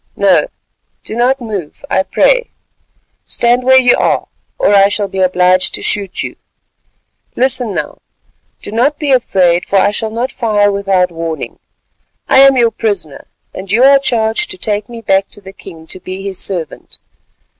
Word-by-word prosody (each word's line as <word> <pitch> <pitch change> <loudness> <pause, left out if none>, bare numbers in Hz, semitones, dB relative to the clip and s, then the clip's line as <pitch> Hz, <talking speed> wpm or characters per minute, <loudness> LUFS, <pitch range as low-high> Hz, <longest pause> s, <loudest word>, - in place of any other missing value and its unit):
"No, - - +2 0.6
do - - -8
not 250 +3 +1
move, 205 -10 -7
I 190 - +1
pray. - - +1 0.7
Stand 240 +1 0
where 260 +1 +5
you 250 -1 +4
are, - - 0 0.3
or - - +2
I 195 -1 +6
shall 205 0 -1
be 190 0 -6
obliged 185 0 +2
to - - -8
shoot 200 -2 -2
you. - - -7 1.0
Listen 255 -4 0
now: - - -5 0.6
do - - -6
not 260 +7 +1
be 295 -3 -2
afraid 185 -9 +2
for - - -4
I 195 - +3
shall 220 +2 -2
not 235 +4 -3
fire 210 -4 +1
without 195 -2 0
warning. 165 -1 -6 0.7
I - - +4
am 275 -1 +6
your 235 -2 +3
prisoner, 200 -12 -4 0.3
and 190 0 -8
you 235 +4 +3
are 275 +1 +6
charged 235 - 0
to 370 - -3
take 210 - -2
me 235 -1 -9
back 195 -2 +1
to - - -10
the 195 -1 -13
king 160 -4 -13
to 185 - -5
be 185 +1 -7
his 195 -2 -3
servant. 175 -5 -2
205 Hz, 170 wpm, -13 LUFS, 190-245 Hz, 1.0 s, I